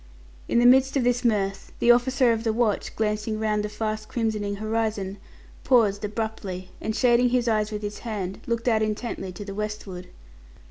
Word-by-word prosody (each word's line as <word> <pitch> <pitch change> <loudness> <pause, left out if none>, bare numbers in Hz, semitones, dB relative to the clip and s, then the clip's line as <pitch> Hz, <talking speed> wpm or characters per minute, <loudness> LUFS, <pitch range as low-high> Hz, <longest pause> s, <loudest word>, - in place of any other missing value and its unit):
In - - +1
the 240 - +5
midst 265 +2 +5
of 265 - +1
this 245 +1 +1
mirth, 195 -4 0
the 240 - +5
officer 245 +1 +3
of 225 0 -3
the 225 - +1
watch, 220 -2 0
glancing 215 0 -1
round 215 -1 0
the 210 - -3
fast 215 0 -3
crimsoning 215 -3 -1
horizon, 215 -2 -2 0.4
paused 215 -5 +3
abruptly, 205 -4 -4
and 220 - -2
shading 245 -1 +4
his 245 -1 +1
eyes 215 -1 +1
with 210 0 -4
his 205 0 -5
hand, 200 -5 -4
looked 235 0 -2
out 220 -2 +3
intently 215 -3 -3
to 180 +3 -8
the 200 - -6
westward. 205 -3 -5
215 Hz, 180 wpm, -25 LUFS, 210-235 Hz, 0.4 s, the